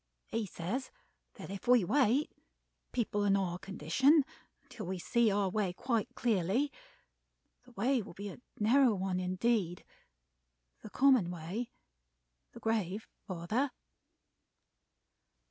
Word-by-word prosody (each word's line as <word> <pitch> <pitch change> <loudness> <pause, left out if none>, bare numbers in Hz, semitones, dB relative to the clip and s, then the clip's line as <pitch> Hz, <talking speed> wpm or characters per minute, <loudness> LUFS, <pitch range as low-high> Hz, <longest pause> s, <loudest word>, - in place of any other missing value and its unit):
He 225 -2 -2
says 195 +11 -4 0.5
that - - -8
if 200 +3 -7
we 245 -4 +6
wait, 265 - +3 0.6
people 210 -4 0
in 200 -1 +4
our 180 -2 -2
condition, 200 - +3 0.4
until 245 -8 -8
we 190 0 -2
see 235 +6 +2
our 200 -1 +1
way 190 -1 0
quite 230 +1 -1
clearly, 230 +5 +1 0.9
the 250 - -17
way 245 +4 +1
will 190 - -10
be 200 +1 -5
a 195 - -10 0.2
narrow 240 +2 +5
one 185 -1 -1
indeed 185 0 0 1.0
the 215 - -9
common 255 -7 +4
way 180 +8 -4 0.8
the - - -10
Grave, 220 -3 -1 0.2
father." 205 +9 -1
210 Hz, 120 wpm, -33 LUFS, 185-245 Hz, 1.0 s, we